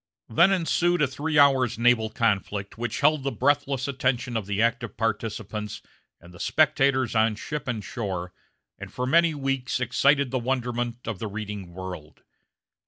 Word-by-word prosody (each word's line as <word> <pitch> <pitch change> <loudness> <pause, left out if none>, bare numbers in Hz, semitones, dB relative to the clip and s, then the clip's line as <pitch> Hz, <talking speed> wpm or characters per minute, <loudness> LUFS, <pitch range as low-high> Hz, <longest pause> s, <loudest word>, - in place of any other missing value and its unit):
Then 170 +12 +5
ensued 175 -2 +2
a - - +3
three 145 +4 -2
hours' 135 -5 +4
naval 115 -2 +3
conflict 100 -3 -1
which 120 0 -4
held 150 0 +4
the 135 +1 -2
breathless 135 -1 0
attention 130 -2 -1
of 110 -4 -2
the 100 0 -2
active 115 +1 0
participants 110 -2 -3 0.4
and 85 +1 -16
the 85 - -14
spectators 135 -5 +2
on 110 -1 +2
ship 150 +6 -5
and 115 -4 -3
shore, 95 -6 -4 0.5
and - - -8
for 125 - -3
many 165 +4 +3
weeks 135 -3 -2
excited 140 +2 +2
the 130 - 0
wonderment 120 -1 -2
of 110 -5 -4
the 110 - -3
reading 105 -3 -6
world. 90 -4 -9
120 Hz, 160 wpm, -25 LUFS, 110-135 Hz, 0.5 s, Then